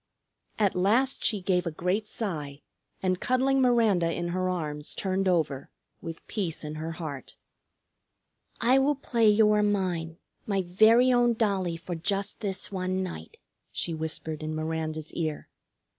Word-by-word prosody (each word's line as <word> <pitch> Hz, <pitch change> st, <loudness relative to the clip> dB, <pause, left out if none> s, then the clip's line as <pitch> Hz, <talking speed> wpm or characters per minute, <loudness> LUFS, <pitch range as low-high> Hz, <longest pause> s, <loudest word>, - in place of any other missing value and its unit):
At 205 Hz, -3 st, +2 dB
last 230 Hz, +9 st, +2 dB
she 210 Hz, -4 st, +2 dB
gave 180 Hz, -1 st, +1 dB
a -, -, -1 dB
great 180 Hz, +7 st, -1 dB
sigh, 150 Hz, -11 st, -4 dB, 0.4 s
and 185 Hz, -1 st, +1 dB
cuddling 265 Hz, +1 st, +2 dB
Miranda 220 Hz, -9 st, +3 dB
in 175 Hz, +1 st, -3 dB
her 185 Hz, +1 st, -1 dB
arms 150 Hz, -4 st, -4 dB
turned 190 Hz, 0 st, 0 dB
over, 155 Hz, -7 st, 0 dB, 0.3 s
with 165 Hz, 0 st, -8 dB
peace 180 Hz, -8 st, -3 dB
in 150 Hz, 0 st, -5 dB
her 160 Hz, +2 st, -4 dB
heart. 150 Hz, -6 st, -7 dB, 1.2 s
"I 250 Hz, +4 st, +4 dB
will 285 Hz, +2 st, +2 dB
play 235 Hz, -5 st, +1 dB
you 210 Hz, 0 st, +5 dB
are 210 Hz, 0 st, +3 dB
mine, 180 Hz, -5 st, -1 dB, 0.3 s
my 195 Hz, -2 st, +1 dB
very 220 Hz, +8 st, +5 dB
own 240 Hz, -1 st, +3 dB
dollie, 195 Hz, -6 st, 0 dB
for 175 Hz, +1 st, -6 dB
just 195 Hz, +4 st, -2 dB
this 195 Hz, -2 st, -3 dB
one 185 Hz, 0 st, -1 dB
night," 80 Hz, -, -7 dB, 0.3 s
she 170 Hz, -, -2 dB
whispered 160 Hz, 0 st, -3 dB
in 155 Hz, 0 st, -3 dB
Miranda's 155 Hz, 0 st, -3 dB
ear. 155 Hz, -3 st, -3 dB
185 Hz, 150 wpm, -28 LUFS, 160-210 Hz, 1.2 s, you